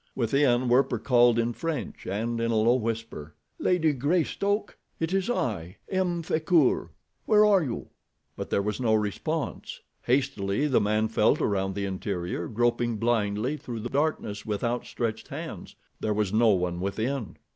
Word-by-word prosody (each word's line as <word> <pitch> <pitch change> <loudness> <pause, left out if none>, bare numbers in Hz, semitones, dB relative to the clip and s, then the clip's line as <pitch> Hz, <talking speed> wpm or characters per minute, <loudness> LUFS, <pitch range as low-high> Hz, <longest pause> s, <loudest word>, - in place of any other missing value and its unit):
Within, 125 0 +2
Werper 125 0 +3
called 120 0 +4
in 115 +1 +1
French 165 +3 -4
and 115 +4 -2
in 115 - 0
a 115 - +1
low 110 +2 +4
whisper: 115 - -3 0.2
"Lady 160 -4 +2
Greystoke! 180 - 0 0.2
It 165 +2 -1
is 195 +2 0
I, 95 - -2
M. 180 -3 0
Frecoult. 160 -3 +2 0.4
Where 215 -1 +6
are 200 -3 +5
you?" 130 -7 -4 0.5
But - - -6
there 100 - +1
was 105 +3 -2
no 110 -3 +3
response. 135 +9 -3 0.2
Hastily 120 -2 0
the 140 -4 +3
man 105 +1 +1
felt 110 0 +2
around 95 -2 0
the 100 -1 -2
interior, 90 -3 -3
groping 120 +1 0
blindly 115 +3 0
through 120 -5 -6
the 120 - -4
darkness 135 -8 -1
with 105 0 -3
outstretched 115 -2 -2
hands. - - -7 0.2
There 105 -1 -1
was 105 -2 0
no 115 +1 +5
one 90 -3 +1
within! 110 +5 -3
115 Hz, 155 wpm, -27 LUFS, 105-140 Hz, 0.5 s, Where